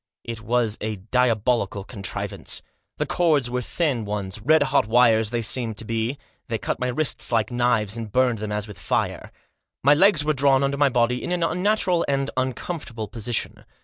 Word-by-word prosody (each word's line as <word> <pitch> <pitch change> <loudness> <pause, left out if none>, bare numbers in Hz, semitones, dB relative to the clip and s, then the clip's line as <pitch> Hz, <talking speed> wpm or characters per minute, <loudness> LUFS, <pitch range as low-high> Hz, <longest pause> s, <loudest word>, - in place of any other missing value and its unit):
It 115 -1 -6
was 115 -1 0
a 110 0 -2
diabolical 110 -1 0
contrivance. 100 -3 -4 0.3
The - - 0
cords 150 -8 +1
were 125 0 -1
thin 135 -3 -1
ones 100 -1 -4
— - - -15
red 155 +3 +5
hot 135 - +2
wires 115 -2 +4
they 120 0 -2
seemed 110 -1 -1
to 115 - -4
me 115 +2 -1
to - - -13
be, - - -31 0.2
they - - -1
cut - - -3
my 125 - -1
wrists 135 +3 +1
like 115 0 +1
knives, 120 -4 +1
and 110 -2 -6
burned 125 -2 +2
them 105 0 -4
as 105 0 -2
with 105 - -11
fire. - - -2 0.5
My 140 +3 +6
legs 170 -1 +4
were 155 - +2
drawn 135 -1 +3
under 140 0 0
my 145 -1 +4
body 125 0 +1
in 175 - -4
an 175 -1 0
unnatural 180 0 +1
and 135 -1 0
uncomfortable 130 -2 -3
position. 115 -1 -3
120 Hz, 195 wpm, -23 LUFS, 110-140 Hz, 0.5 s, My